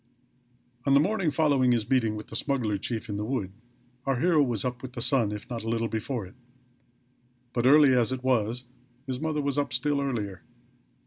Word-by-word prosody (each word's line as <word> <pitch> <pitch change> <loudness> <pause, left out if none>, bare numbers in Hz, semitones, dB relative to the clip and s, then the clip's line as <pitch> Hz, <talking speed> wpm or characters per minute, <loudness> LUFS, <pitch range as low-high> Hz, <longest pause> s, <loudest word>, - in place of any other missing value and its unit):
On 140 - +5
the - - +7
morning 195 +1 +1
following 140 -4 +3
his 110 -3 0
meeting 120 -5 +2
with 105 - -8
the - - -7
smuggler 115 -6 -1
chief 115 +1 -4
in 105 -2 -3
the 105 - -2
wood 105 -5 -2 0.6
our 135 -2 +1
hero 165 0 +4
was 120 -6 0
up 125 -1 -3
with 130 -1 -8
the 125 - -6
sun, 120 -3 +2
if 105 -1 -6
not 115 -2 -5
a 115 - -3
little 115 0 0
before 110 0 -3
it. 95 - -14 1.2
But, 120 0 +2
early 145 -1 +7
as 125 -1 +2
it 130 -1 -4
was, 125 -1 +1 0.4
his 130 -2 -4
mother 155 -1 -1
was 140 0 0
up 145 - -1
still 145 -1 0
earlier. 105 -9 -3
125 Hz, 200 wpm, -27 LUFS, 110-140 Hz, 1.2 s, the